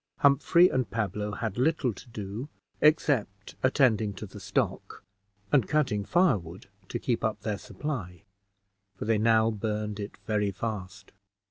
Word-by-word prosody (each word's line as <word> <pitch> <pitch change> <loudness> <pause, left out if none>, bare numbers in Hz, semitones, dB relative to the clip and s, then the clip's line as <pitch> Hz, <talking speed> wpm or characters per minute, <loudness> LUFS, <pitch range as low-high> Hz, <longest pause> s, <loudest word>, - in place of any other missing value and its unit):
Humphrey 145 +5 +6
and 130 -8 -1
Pablo 105 -1 -2
had 110 +1 -3
little 135 -3 +2
to 120 - -13
do 110 +5 -6 0.3
except 130 -10 +2
attending 115 -6 +3
to 105 - -6
the 105 +1 -11
stock, - - -2 0.5
and 130 -9 +4
cutting 125 -10 +1
firewood 100 - +1 0.2
to - - -2
keep 120 0 -1
up 110 -1 -1
their 105 -2 -2
supply, 100 - -5 0.7
for - - -6
they 110 -1 +2
now 110 0 +4
burned 105 -1 -3
it 100 0 -6
very 105 -2 +1
fast. 100 -1 -5
110 Hz, 140 wpm, -28 LUFS, 100-130 Hz, 0.7 s, Humphrey